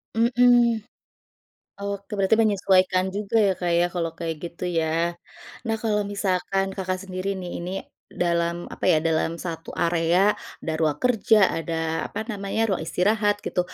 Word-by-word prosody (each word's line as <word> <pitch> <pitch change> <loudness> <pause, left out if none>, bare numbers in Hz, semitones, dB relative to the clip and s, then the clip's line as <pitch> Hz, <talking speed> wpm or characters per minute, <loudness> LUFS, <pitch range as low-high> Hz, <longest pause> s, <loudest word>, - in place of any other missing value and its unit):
Mhm. 240 -1 +4 1.0
Oke, 200 +1 -5
berarti 195 +2 +4
menyesuaikan 190 -3 +3
juga 205 +2 -2
ya, 190 - +3
Kak, 175 -1 0
ya, 175 - +4
kalau 165 -2 -1
kayak 165 -1 -3
gitu 170 +1 -6
ya. 160 - +2 0.8
Nah, 225 -1 0
kalau 210 -2 +1
misalkan 195 -1 0
Kakak 185 -1 -2
sendiri 185 +1 -4
nih, 180 -1 -6
ini 180 - -4 0.5
dalam 170 -1 +1 0.2
apa - - -6
ya, 155 - +4
dalam 165 +1 0
satu 165 -2 -5
area, 170 +4 +3 0.3
ada 160 - -3
ruang 155 -2 +1
kerja, 225 -3 +4 0.2
ada 165 0 -2
apa - - -4
namanya, 200 -1 -3
ruang 175 - -4
istirahat 205 +4 +2
gitu. - - 0
185 Hz, 150 wpm, -24 LUFS, 170-210 Hz, 1.0 s, Mhm